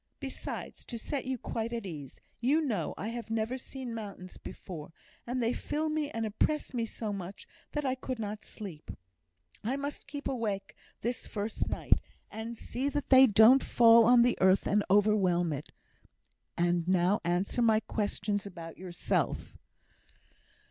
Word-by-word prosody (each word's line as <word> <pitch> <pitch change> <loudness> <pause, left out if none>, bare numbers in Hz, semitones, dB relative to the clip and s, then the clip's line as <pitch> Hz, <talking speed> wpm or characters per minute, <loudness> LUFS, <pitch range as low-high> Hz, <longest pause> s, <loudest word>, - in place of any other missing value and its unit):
Besides, 270 -2 -6
to 235 - -6
set 270 +4 -4
you 260 0 -1
quite 230 0 -3
at 230 -3 -3
ease, 150 -7 -8 0.2
you 270 +7 +3
know 220 - -1
I 210 - -3
have 235 -1 -6
never 225 +2 -1
seen 260 -1 -6
mountains 200 -5 -7
before, 165 -4 -8 0.4
and 250 0 -1
they 230 +2 +2
fill 305 +4 -2
me 305 -1 -1
and 225 -6 -2
oppress 285 +9 0
me 230 -2 -1
so 215 -1 -4
much 195 0 -7 0.3
that 295 -1 -1
I 260 - +2
could 255 0 -4
not 210 -1 -5
sleep; 185 -8 -9 0.7
I 240 +5 0
must 285 +1 -5
keep 285 +1 -5
awake 210 -6 -2 0.3
this 240 +1 -3
first 210 +1 -3
night, - - +2 0.3
and 225 +2 -6
see 260 +6 -2
that 285 0 -3
they 260 0 +9
don't 225 +5 +7
fall 230 -1 +7
on 240 0 +7
the 245 0 +2
earth 190 +1 +5
and 205 0 +2
overwhelm 190 -5 +3
it. 145 +1 -6 0.9
And 175 0 +1
now 185 +2 +3
answer 175 +7 0
my 220 -2 +5
questions 205 -2 -1
about 165 -3 -9
yourself." 180 -1 -1
220 Hz, 160 wpm, -31 LUFS, 195-250 Hz, 0.9 s, they